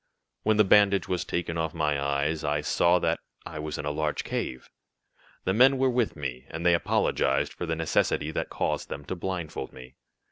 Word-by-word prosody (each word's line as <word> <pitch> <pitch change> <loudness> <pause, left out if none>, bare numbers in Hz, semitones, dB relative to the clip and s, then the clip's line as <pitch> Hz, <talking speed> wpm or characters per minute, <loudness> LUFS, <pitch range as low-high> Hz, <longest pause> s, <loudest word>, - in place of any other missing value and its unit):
"When 110 0 +2
the 105 - +7
bandage 100 0 +4
was 90 -1 -1
taken 85 -1 -2
off 80 -1 -2
my 75 -2 0
eyes 70 +2 0
I 75 +1 0
saw 85 +4 +3
that - - 0 0.3
I 75 - -6
was 75 0 -4
in - - -5
a 75 - 0
large 75 0 -1
cave. 65 - -4 0.8
The 95 - +1
men 130 +5 +6
were 130 0 +3
with 120 -3 0
me, 65 -4 -5
and 80 +1 -5
they 85 - +6
apologized 70 -4 +1
for 85 - -5
the 80 - 0
necessity 80 -1 +1
that - - -3
caused - - -2
them 70 - -6
to 95 - -4
blindfold 90 -3 -4
me. 65 0 -12
80 Hz, 200 wpm, -27 LUFS, 75-95 Hz, 0.8 s, the